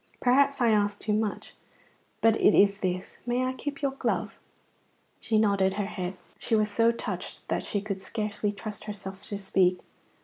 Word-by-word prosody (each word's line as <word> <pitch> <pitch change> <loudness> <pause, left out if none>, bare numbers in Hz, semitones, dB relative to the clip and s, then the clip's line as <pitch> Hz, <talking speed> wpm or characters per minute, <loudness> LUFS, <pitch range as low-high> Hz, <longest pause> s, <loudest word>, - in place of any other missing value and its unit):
"Perhaps 275 +2 +3
I 235 -2 +4
ask 205 -1 +1
too 215 - -1
much, 215 -1 -2 0.7
but 225 -1 +5
it - - +6
is 200 0 +5
this: 185 -1 -3
may 245 +1 +1
I 255 - -1
keep 285 +2 -6
your 275 - +2
glove?" 270 - -2 0.8
She 220 - 0
nodded 200 -3 +3
her 205 - -1
head; 185 -2 -5 0.2
she 225 - 0
was 215 -1 +2
so 230 +2 +4
touched 235 - -5
that - - 0
she 205 - -2
could 200 -2 -4
scarcely 210 0 -2
trust 205 0 -6
herself 195 -2 -6
to 205 - -4
speak. 190 -2 +2
210 Hz, 175 wpm, -28 LUFS, 195-230 Hz, 0.8 s, it